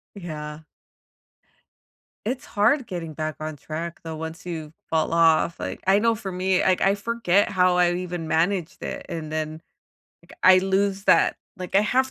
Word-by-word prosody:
Yeah. 155 -5 -7 1.7
It's 255 +3 -2
hard 235 +6 +2
getting 165 -4 -6
back 155 0 -3
on 155 -1 -5
track, 165 +4 -6
though, 160 -1 -5
once 160 +2 -7
you 160 -3 -6 0.2
fall 160 0 +1
off. 165 0 +3
Like, 95 +1 -5
I 195 +1 +5
know 230 +1 +3
for 205 -3 -6
me, 185 0 +1
like, 185 -1 +2
I 195 +1 +4
forget 205 -2 +1
how 180 -2 +3
I 175 0 +4
even 175 -3 -4
managed 175 +1 0
it, - - -5
and 155 -2 -5
then, 155 0 -3 0.6
like, 170 - -18
I 185 0 +8
lose 195 +1 0
that - - +4 0.2
like, 180 0 -7
I 200 - +6
have 260 +4 +1
180 Hz, 170 wpm, -24 LUFS, 160-195 Hz, 1.7 s, I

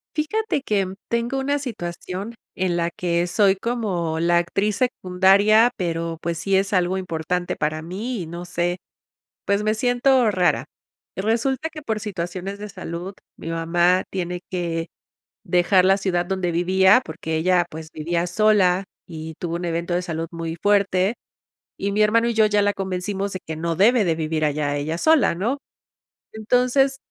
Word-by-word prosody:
Fíjate 315 +2 -1
que 195 -6 0 0.2
tengo 235 +3 -1
una 285 +2 0
situación 195 -3 -6 0.2
en 185 -2 0
la 170 0 0
que 170 0 -1
soy 195 +2 +3
como 190 -8 -2
la 170 +1 +3
actriz 195 +4 0
secundaria, 205 0 +4
pero 165 -2 -2
pues 170 0 -2
sí 195 +4 -1
es 195 +1 +2
algo 185 +1 +1
importante 175 0 -2
para 155 +1 -1
mí 200 +7 -4
y - - -7
no 170 +2 -7
sé, 175 0 -1 0.7
pues 200 +1 0
me 215 0 +2
siento 245 +1 +3
rara, 180 -3 +2 0.5
resulta 235 +9 0
que 315 -1 -9
por 220 -6 -2
situaciones 190 -1 -5
de 210 0 -7
salud, 180 0 -6 0.2
mi 165 - -8
mamá 175 +2 +2
tiene 180 -1 -3
que 170 -3 -2 0.6
dejar 180 +1 +3
la 190 +1 +5
ciudad 185 -3 -1
donde 185 -1 -1
vivía 190 +6 +4
porque 160 0 -4
ella, 175 +1 +2
pues 160 0 -9
vivía 170 +3 -1
sola 195 -1 +3 0.2
y 160 -1 -7
tuvo 170 -1 -3
un 175 - -4
evento 170 0 -2
de 175 - +1
salud 165 -2 -4
muy 165 -1 -5
fuerte 200 -1 +2 0.6
y 200 - -2
mi 210 +2 +2
hermano 230 +2 +3
y 235 - -1
yo 220 -1 +5
ya 210 -1 +2
la 205 0 +1
convencimos 195 +1 -3
de 185 - -5
que 160 - -5
no 165 +1 -2
debe 215 +6 +4
de 170 -3 +1
vivir 155 -1 -1
allá 145 -1 0
ella 155 +3 -2
sola, 315 - +4
¿no?, 225 +11 -1 0.8
entonces, 250 +5 +2
185 Hz, 165 wpm, -22 LUFS, 170-215 Hz, 0.8 s, la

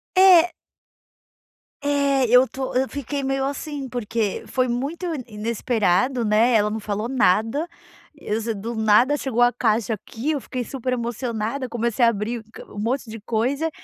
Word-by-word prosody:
É. 365 -2 +7 1.3
É, 280 -2 +2
eu 250 +2 +6
tô 265 -1 -5
eu 260 +1 +2
fiquei 285 0 -4
meio 270 0 0
assim, 285 -1 -4
porque 225 -3 -2
foi 255 -1 0
muito 280 +9 -3
i 310 -7 -3
inesperado, 230 +1 +1
né, 220 +4 +3
ela 210 -1 +3
não 220 +1 -3
falou 210 +2 -3
nada, 240 - +2 0.5
eu 220 -7 -3
se 225 0 -2
do 225 +3 -5
nada 220 +7 +4
chegou 245 -4 -1
a 245 0 +6
caixa 225 -2 0
aqui, 225 +7 -4
eu 295 - -1
fiquei 250 -1 -4
super 255 0 -3
emocionada, 235 +1 -3
comecei 235 0 +1
a - - +6
abrir 225 +2 -3
q - - -10
um 205 - -8
monte 235 +2 -2
de 225 0 -7
coisa, 250 +9 -1
245 Hz, 165 wpm, -23 LUFS, 220-270 Hz, 1.3 s, É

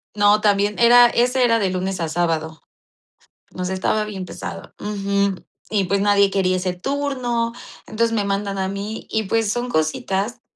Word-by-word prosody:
No, 205 0 +4
también 205 0 +2
era 240 +1 +7
ese 250 +2 +2
era 230 -1 +3
de 195 -3 +1
lunes 185 +1 -3
a 165 - -1
sábado. 160 -1 -2 0.9
Nos 180 0 -4
estaba 190 +3 0
bien 200 -3 -6
pesado. - - -8
Ujú. 200 -2 -1 0.3
Y, 205 -3 +1
pues, 195 +2 0
nadie 200 -1 +4
quería 185 -1 +1
ese 185 0 -2
turno. 245 +1 -2 0.3
Entonces, 230 +1 0
me 210 -3 0
mandan 200 0 -2
a 190 0 -1
mí, 200 +3 -5
y 220 - 0
pues, 215 +1 0
son 245 +2 -2
cositas 195 +7 -1
200 Hz, 165 wpm, -21 LUFS, 190-230 Hz, 0.9 s, era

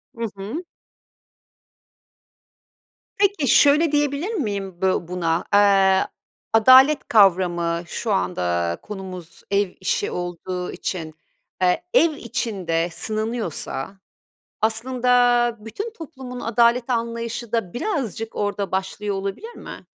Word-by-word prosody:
Hı 230 0 -3
hı. 220 - -5 2.5
Peki, 400 -7 +2
şöyle 290 +5 +5
diyebilir 295 +7 0
miyim 200 - -3
bö 190 -1 +3
buna? 170 -1 -1
Eee, 195 -2 +5 0.5
adalet 260 +6 +6
kavramı 175 -5 +3
şu 225 - -3
anda 85 - -1
konumuz 185 -4 -9
ev 200 -2 +1
işi 185 - -1
olduğu 180 +1 -4
için, 160 -4 -5 0.5
eee, 185 - +2
ev 335 -9 +5
içinde 185 - -2
sınanıyorsa, 215 - -3 0.7
aslında, 245 +1 +2
bütün 225 - -6
toplumun 265 - -9
adalet 235 +2 +2
anlayışı 235 -1 -3
da 225 -7 -1
birazcık 240 - -3
orada 205 -1 -2
başlıyor 195 +2 -2
olabilir 195 - -5
mi? - - -10
215 Hz, 100 wpm, -22 LUFS, 185-250 Hz, 2.5 s, adalet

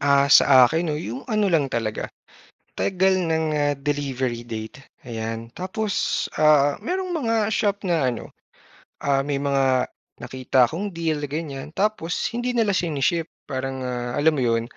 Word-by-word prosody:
Ah, 140 0 +3
sa 130 -2 +8
akin 160 +1 -1
'no - - -2
yung 135 -3 -6
ano 215 -2 +2
lang 150 -4 +3
talaga 110 -2 -2 0.7
tagal 190 0 +2
ng, 160 -3 0
ah, 145 -1 +1
delivery 135 -4 -2
date, 110 0 -6 0.2
ayan. 115 -1 -5
Tapos, 200 +3 -1
ah, 150 -2 +4
mayrong 370 +1 -3
mga 230 -9 0
shop 205 -2 0
na 165 -7 +1
ano, 120 -2 -5 0.7
ah, 140 -1 +2
may 145 +1 -2
mga 135 -2 +1 0.3
nakita 130 -1 +1
akong 195 +6 -4
deal 165 -2 -1
ganyan 145 -1 -5
tapos 195 -4 -1
hindi 245 +1 -2
nila 215 -5 +2
shini-ship 165 0 0 0.2
parang, 130 -1 -3
ah, 120 -1 -3
alam 155 +2 +4
mo - - 0
yun, 115 -2 +1
145 Hz, 150 wpm, -23 LUFS, 130-180 Hz, 0.7 s, sa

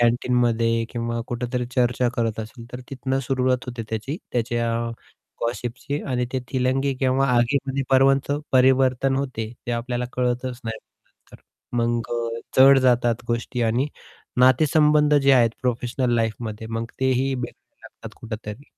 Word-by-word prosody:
कॅन्टीनमध्ये 120 -1 +2
किंवा 115 0 -3
कुठेतरी 125 0 -3
चर्चा 125 0 +2
करत 115 -2 -1
असेल, 115 +2 -9
तर 125 - -6
तिथून 135 0 -2
सुरुवात 130 0 0
होते 120 -2 -5
त्याची. 110 +7 -3 0.2
त्याच्या 120 -1 0 0.7
गॉसिपची 120 +4 -3
आणि 125 -2 0
ते 130 - 0
थीलंगी 130 +1 +1
केंव्हा 135 +1 +2
आगीमध्ये 135 +2 +1
पर्वांच 135 +1 +4 0.3
परिवर्तन 130 0 +3
होते, 125 -5 -3
ते 120 - -2
आपल्याला 120 +1 -2
कळतच 125 0 -2
नाही 110 -1 -4
नंतर. - - -22 0.4
मग 120 0 0
अ, 115 -1 -2 0.2
जड 135 +1 +8
जातात 120 -3 +2
गोष्टी 120 +1 -2
आणि 115 +4 +1 0.5
नातेसंबंध 150 +3 +4
जे 140 -1 +5
आहेत, 120 -3 +5
प्रोफेशनल 125 0 0
लाईफमध्ये 110 -1 -2
मग 115 0 -2
तेही 130 +1 +1
बिघडू 125 -1 -8
लागतात - - -12
कुठेतरी. 110 +2 -7
125 Hz, 135 wpm, -23 LUFS, 115-130 Hz, 0.7 s, जड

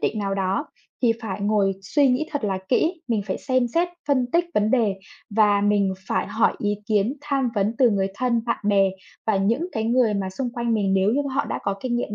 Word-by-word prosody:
định 220 - -1
nào 195 -1 -1
đó 195 +8 -1 0.4
thì 235 -2 +4
phải 205 -2 -4
ngồi 200 -1 +2
suy 285 +7 +2
nghĩ 255 +5 +1
thật 290 -6 -3
là 195 -2 -1
kỹ. 325 +6 +1
Mình 220 -4 0
phải 190 -1 -4
xem 255 -2 +1
xét, 340 +8 +1 0.2
phân 260 -3 +2
tích 345 +1 +3
vấn 210 +1 +2
đề 225 -6 +2 0.4
và 205 -1 +3
mình 205 -2 +2
phải - - 0
hỏi 225 - +2
ý 205 0 0
kiến, 215 +5 +1
tham 275 -4 0
vấn 205 +2 0
từ 250 -3 +5
người 195 -2 +1
thân, 240 +1 +1
bạn 235 - 0
bè 195 -2 +4 0.4
và 220 -3 +2
những 230 - +1
cái 220 0 -2
người 235 -2 +2
mà 195 -1 -2
xung 245 +6 -3
quanh 235 -1 -1
mình 195 -2 +1
nếu 195 +2 +3
như 285 +2 +1
mà 270 -2 -5
họ 280 - +1
đã - - -3
có 200 - -1
kinh 240 0 -1
nghiệm 225 -3 -3
220 Hz, 235 wpm, -23 LUFS, 200-255 Hz, 0.4 s, từ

